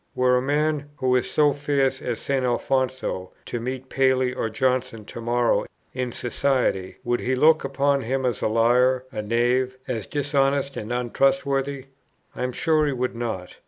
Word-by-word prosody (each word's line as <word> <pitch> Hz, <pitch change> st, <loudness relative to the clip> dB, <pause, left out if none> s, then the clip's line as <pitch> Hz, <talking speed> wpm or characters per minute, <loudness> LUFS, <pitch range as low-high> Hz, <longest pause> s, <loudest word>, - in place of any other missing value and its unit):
Were 125 Hz, 0 st, +3 dB
a 125 Hz, -, +2 dB
man, 145 Hz, +1 st, 0 dB
who 130 Hz, -1 st, +2 dB
is 125 Hz, -, +1 dB
so 150 Hz, -2 st, +3 dB
fierce 140 Hz, -2 st, 0 dB
with 120 Hz, -5 st, -2 dB
St. 135 Hz, -2 st, -1 dB
Alfonso, 130 Hz, -5 st, -1 dB
to 120 Hz, -, -4 dB
meet 130 Hz, +2 st, -5 dB
Paley 130 Hz, -1 st, +2 dB
or 115 Hz, -3 st, -2 dB
Johnson 130 Hz, -2 st, -1 dB
to 120 Hz, -, -8 dB
morrow 120 Hz, +1 st, +1 dB, 0.3 s
in 125 Hz, -1 st, -2 dB
society, 125 Hz, -7 st, -1 dB
would 120 Hz, 0 st, 0 dB
he 130 Hz, +1 st, 0 dB
look 155 Hz, +4 st, +5 dB
upon 140 Hz, 0 st, +1 dB
him 130 Hz, +2 st, -1 dB
as 120 Hz, -4 st, -1 dB
a -, -, +2 dB
liar, 125 Hz, +3 st, +3 dB
a 110 Hz, -4 st, -3 dB
knave, 120 Hz, +4 st, +1 dB
as 115 Hz, -6 st, -3 dB
dishonest 140 Hz, -1 st, 0 dB
and 110 Hz, +2 st, -5 dB
untrustworthy? 135 Hz, +2 st, 0 dB, 0.5 s
I -, -, -6 dB
am 125 Hz, 0 st, -1 dB
sure 155 Hz, +3 st, +2 dB
he 145 Hz, -, 0 dB
would 125 Hz, -1 st, -2 dB
not. 110 Hz, -7 st, -5 dB
130 Hz, 170 wpm, -24 LUFS, 120-135 Hz, 0.5 s, look